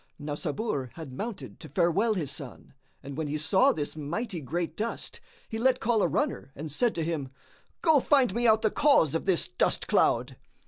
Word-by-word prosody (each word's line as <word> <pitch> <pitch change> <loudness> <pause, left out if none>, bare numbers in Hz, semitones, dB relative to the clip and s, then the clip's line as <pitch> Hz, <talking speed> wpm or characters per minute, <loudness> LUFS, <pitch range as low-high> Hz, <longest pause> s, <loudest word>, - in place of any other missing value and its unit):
Now 145 -1 -5
Sabur 150 - -2
had 160 -6 -8
mounted 140 - -6
to 155 - -10
farewell 180 - +2
his 150 -7 -2
son, 140 -4 -8 0.3
and 140 0 -7
when 155 0 -2
he 150 +1 -2
saw 190 - +4
this 145 0 -3
mighty 170 +5 -4
great 165 +5 -3
dust, 225 +2 -4 0.3
he 225 - -5
let 255 +1 +3
call 225 -2 +2
a - - +3
runner 280 - -2
and 150 +1 -6
said 235 - +1
to 165 - -1
him, 155 -5 -3 0.5
"Go 320 -4 +6
find 270 -2 +3
me 235 +1 +1
out 220 0 +4
the 215 - +3
cause 280 - +4
of 165 - -2
this 185 -3 +2
dust - - 0
cloud." - - +2
170 Hz, 195 wpm, -28 LUFS, 150-230 Hz, 0.5 s, Go